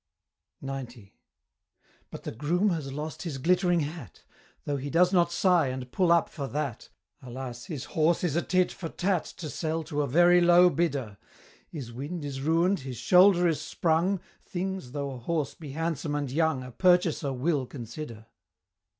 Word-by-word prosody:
XC. 125 -6 -7 1.0
But - - -9
the - - -4
Groom 175 - +1
has 155 -5 -3
lost 150 +3 -5
his 160 -6 -4
glittering 175 +3 +2
hat! 145 - -7 0.4
Though 145 -1 -1
he 140 +1 -5
does 180 +4 +3
not 170 -2 +3
sigh 175 -3 +3
and 130 -1 -5
pull 180 +2 +2
up 170 -1 +4
for 140 -3 -6
that 140 -4 -4 0.3
Alas! 125 -1 -7
his 150 -8 -5
horse 160 +2 +1
is 165 -5 0
a 170 - +2
tit 185 0 +1
for 165 - -6
Tat 185 -1 0
To 165 - -8
sell 160 +2 -2
to 150 -2 -2
a 145 - 0
very 175 +6 +5
low 175 +1 +6
bidder 135 -10 -2 0.5
His 130 -7 -7
wind 145 +6 -5
is 135 -2 -5
ruin'd, 165 +6 +2
his 130 -3 -7
shoulder 180 - +5
is 160 -3 0
sprung, 175 +4 +1 0.2
Things, 185 -7 -4
though 140 -1 -3
a 130 - -7
horse 155 +4 -2
be 150 -5 -9
handsome 160 -2 -2
and 145 -3 -2
young, 160 -2 +1
A 125 - -9
purchaser 175 -3 +2
will 135 +1 0
consider. 120 -2 -8
155 Hz, 170 wpm, -28 LUFS, 135-175 Hz, 1.0 s, low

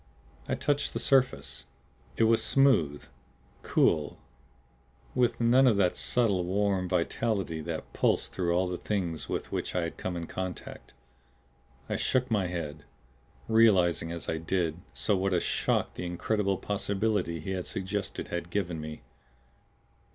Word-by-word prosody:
I - - +1
touched 145 -1 0
the - - -2
surface. 135 -2 +1 0.5
It - - +3
was 115 0 +4
smooth, 85 - +3 0.6
cool 75 -2 +2 1.0
with 125 -2 +1
none 125 +3 +5
of 110 -5 +4
that 90 -3 +2
subtle, 105 -7 +2
warm 95 0 0
vitality 90 -1 -1
that 80 0 -5
pulsed - - +1
through 90 -2 0
all 90 +1 +2
the 90 -1 -4
Things 90 -6 -2
with - - -3
which - - -3
I 90 - +1
had 85 - -5
come 90 -1 -3
in 85 - -4
contact. 95 +1 -6 0.9
I - - -1
shook 130 -1 0
my 100 -4 +2
head, 80 -4 -5 0.6
realizing 95 -7 +4
as 85 0 -6
I 80 - -1
did 85 0 -1
so 105 - +1
what 95 0 0
a - - +3
shock - - 0
the - - -6
incredible 100 +2 0
possibility 100 -3 -1
he 90 +5 -5
had 95 -2 -3
suggested 95 +1 -4
had 85 0 -4
given 90 -4 -2
me. 75 -2 -8
95 Hz, 145 wpm, -29 LUFS, 85-105 Hz, 1.0 s, none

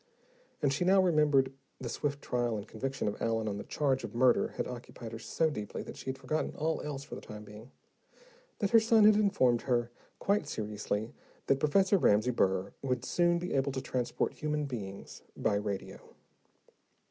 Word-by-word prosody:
And 140 -2 +3
she 145 - 0
now 190 +2 +5
remembered 150 -7 +3 0.3
the 130 - -5
swift 145 +3 -3
trial 120 -2 0
and 105 +1 -7
conviction 135 +4 -3
of 105 - -3
Allen 115 -1 0
on 100 -1 -2
the - - -5
charge 135 -3 0
of - - -7
murder 125 0 +4
had - - -1
occupied 120 -2 -8
her 115 - -6
so 160 +8 0
deeply 105 -7 -5
that - - -9
she - - -11
had 130 - -3
forgotten 140 +4 -2
all 160 +1 -1
else 140 -2 -5
for - - -11
the - - -6
time 105 0 -9
being 105 +4 -12 0.9
that 200 - -1
her 230 - +8
son 225 -1 +4
had 215 - +8
informed 160 - +3
her 120 -2 0 0.3
quite 205 +2 +1
seriously 105 0 -3 0.3
that 135 - +2
Professor 190 +7 +3
Ramsey 110 -2 +4
Burr 95 -4 +1
would 125 -2 -1
soon 175 +3 +2
be 180 +1 -3
able 135 0 +1
to 135 - -2
transport 125 -2 -1
human 150 -1 -2
beings 100 -8 -7 0.2
by - - +1
radio. 100 -1 -3
130 Hz, 185 wpm, -31 LUFS, 110-150 Hz, 0.9 s, her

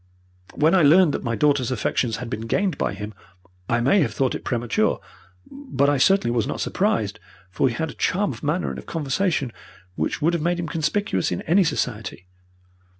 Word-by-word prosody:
When 155 +4 +3
I 190 - +5
learned 155 +1 +6
that - - -3
my 115 -2 -1
daughter's 140 +1 +2
affections 120 -1 0
had 125 +1 -6
been 110 0 -5
gained 190 - 0
by - - -2
him, 105 +2 -7 0.6
I 120 +1 +2
may 140 +11 +4
have 115 -7 -1
thought 130 0 +1
it - - -5
premature, 120 -2 0 0.5
but 260 - -1
I 145 - +1
certainly 190 -6 +3
was 115 - +1
not - - -4
surprised, - - 0 0.3
for 130 - +2
he 115 - -4
had 160 +1 -2
a - - -12
charm 200 +2 0
of - - -11
manner 155 +5 -1
and - - -6
of - - -13
conversation 155 -3 -1 0.4
which - - -2
would 165 +3 +2
have 170 - 0
made 175 +2 0
him 170 - -3
conspicuous 160 - -1
in 90 - -3
any 185 +5 +4
society. 110 - -3
145 Hz, 200 wpm, -23 LUFS, 120-175 Hz, 0.6 s, learned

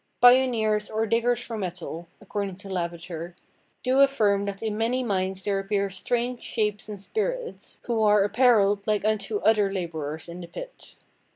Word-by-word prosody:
"Pioneers 240 -4 +4
or 220 +1 0
diggers 235 +2 +1
for 225 -2 -5
metal," 175 -2 -5
according 200 -2 -4
to 200 +2 -11
Lavater, 170 -1 -4 0.5
"do 255 +1 +2
affirme 210 -8 +3
that 200 +1 -5
in 215 -1 -1
many 235 +4 0
mines 190 -3 -1
there 200 -1 0
appeare 200 0 0
straunge 240 +6 -1
shapes 210 -1 -2
and 205 -2 -6
spirites, 470 - -4
who 230 -2 0
are 210 -1 +5
apparelled 205 -2 +3
like 210 -1 +1
unto 215 -1 0
other 210 -3 +3
laborers 160 -4 -4
in 170 +1 -8
the 170 - -8
pit. - - -10
210 Hz, 160 wpm, -26 LUFS, 190-230 Hz, 0.5 s, are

